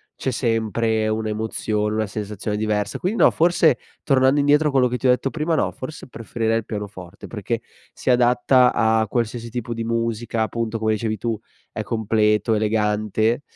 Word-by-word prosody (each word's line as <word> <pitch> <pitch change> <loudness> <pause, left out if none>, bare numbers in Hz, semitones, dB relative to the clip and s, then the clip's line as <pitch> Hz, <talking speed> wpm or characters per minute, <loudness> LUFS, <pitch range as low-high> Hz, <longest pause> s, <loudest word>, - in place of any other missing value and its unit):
c'è 130 - -3
sempre 115 -2 0
un'emozione, 110 -1 -1
una 110 0 0
sensazione 105 0 -4
diversa. 105 -1 -1
Quindi 195 +6 -1
no, - - +7
forse 165 -4 +3 0.2
tornando 135 0 +3
indietro 145 +2 +4
a - - -3
quello 130 -2 +3
che 125 +1 -2
ti 130 - 0
ho - - +6
detto 130 +2 0
prima, 160 +1 -1
no, - - +1
forse 135 +3 -8
preferirei 115 -1 -2
il 115 - -4
pianoforte, 100 -4 -7
perché 115 +1 -3 0.3
si 130 - -1
adatta 125 +1 +4
a 110 0 +2
qualsiasi 115 +1 -2
tipo 120 0 -4
di 115 0 -4
musica, 115 0 -1
appunto 115 +1 -2
come 110 0 0
dicevi 110 0 -2
tu 115 -2 -2 0.3
è 110 - -4
completo, 110 0 +1
elegante 110 +2 +1
115 Hz, 170 wpm, -22 LUFS, 110-125 Hz, 0.3 s, no